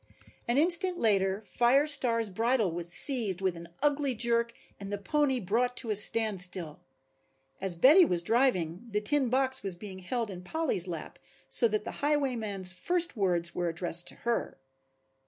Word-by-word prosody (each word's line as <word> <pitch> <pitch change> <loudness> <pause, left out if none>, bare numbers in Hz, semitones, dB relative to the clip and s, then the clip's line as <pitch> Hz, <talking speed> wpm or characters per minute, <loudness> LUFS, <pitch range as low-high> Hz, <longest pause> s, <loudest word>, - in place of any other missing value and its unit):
An 240 +2 0
instant 355 +3 +3
later 195 - 0
Fire 245 +6 +1
Star's 235 -7 0
bridle 225 -1 -1
was 170 0 -4
seized 220 - +6
with 190 -2 -2
an 170 0 -11 0.2
ugly 285 -3 0
jerk 235 0 0 0.3
and 200 0 -9
the 205 - -3
pony 265 +5 -1
brought 240 +5 -2
to 230 - -1
a - - -1
standstill. 185 -7 0 0.8
As 190 -2 0
Betty 290 - +6
was 175 - +1
driving, 205 -4 -1
the 210 -1 -2
tin 260 +5 0
box 260 +1 -1
was 195 -3 -5
being 190 0 -10
held 225 +3 -4
in 180 -1 -9
Polly's 225 - -2
lap 165 -3 -8 0.3
so 235 - +5
that 215 -1 -3
the - - -9
highwayman's 235 -11 -2
first 345 - -1
words 175 -5 -1
were 175 -1 -3
addressed 175 +1 +2
to - - -7
her. 235 -1 -3
220 Hz, 165 wpm, -28 LUFS, 185-260 Hz, 0.8 s, seized